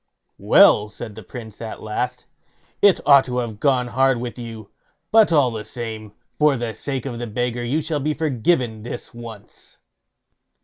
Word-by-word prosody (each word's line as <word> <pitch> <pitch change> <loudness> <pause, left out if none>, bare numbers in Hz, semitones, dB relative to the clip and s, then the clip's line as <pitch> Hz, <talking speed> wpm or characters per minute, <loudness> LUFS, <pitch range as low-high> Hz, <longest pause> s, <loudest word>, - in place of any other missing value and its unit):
"Well", 105 0 +5
said 110 +1 -8
the 110 - -10
Prince 110 +2 -10
at 110 -1 -7
last, 125 +3 -3 0.6
"it 200 -2 +5
ought 140 -2 +7
to 125 -1 -4
have 115 -4 -3
gone 125 -3 +1
hard 130 0 +2
with 120 0 -6
you; 115 -3 -9 0.4
but 220 -4 +5
all 145 -6 +4
the 110 -2 -5
same, 110 -3 -7 0.3
for 150 -3 +4
the 115 -2 -3
sake 135 +4 -4
of 120 -3 -5
the 120 - -4
beggar 120 +2 -2
you 140 +7 0
shall 155 -1 -2
be 150 +2 -1
forgiven 130 -5 0
this 120 +2 -8
once." 115 -3 -12
120 Hz, 170 wpm, -21 LUFS, 110-135 Hz, 0.6 s, ought